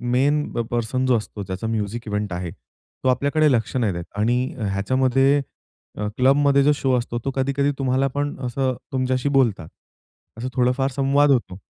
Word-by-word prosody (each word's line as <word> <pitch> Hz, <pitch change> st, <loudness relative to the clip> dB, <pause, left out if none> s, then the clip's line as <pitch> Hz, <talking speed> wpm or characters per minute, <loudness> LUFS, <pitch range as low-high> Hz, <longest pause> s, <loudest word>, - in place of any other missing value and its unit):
Main 145 Hz, +3 st, +2 dB
प -, -, -2 dB
person 120 Hz, +2 st, -1 dB
जो 125 Hz, -2 st, +3 dB
असतो 105 Hz, -1 st, -6 dB
त्याचा 95 Hz, +4 st, -5 dB
म्युझिक 110 Hz, +1 st, -3 dB
इव्हेंट 105 Hz, -2 st, -2 dB
आहे 90 Hz, -1 st, -4 dB
तो 130 Hz, -, -7 dB
आपल्याकडे 145 Hz, +4 st, +2 dB
लक्ष 120 Hz, -1 st, 0 dB
नाही 110 Hz, -7 st, +1 dB
देत. 85 Hz, 0 st, -4 dB
आणि 120 Hz, +4 st, +1 dB, 0.3 s
ह्याच्यामध्ये 130 Hz, +7 st, +2 dB, 0.8 s
क्लबमध्ये 140 Hz, +2 st, +4 dB
जो 150 Hz, -, +4 dB
शो 135 Hz, -2 st, 0 dB
असतो 120 Hz, 0 st, -3 dB
तो 135 Hz, -, 0 dB
कधी-कधी 140 Hz, +1 st, +1 dB
तुम्हाला 130 Hz, 0 st, +1 dB
पण 145 Hz, 0 st, -1 dB
असं 130 Hz, +1 st, 0 dB, 0.2 s
तुमच्याशी 130 Hz, +1 st, 0 dB
बोलतात. 120 Hz, -, +1 dB, 0.7 s
असं 120 Hz, -, -4 dB
थोडाफार 130 Hz, +2 st, +1 dB
संवाद 140 Hz, +2 st, +3 dB
होतो. 115 Hz, -8 st, 0 dB
130 Hz, 160 wpm, -22 LUFS, 115-140 Hz, 0.8 s, क्लबमध्ये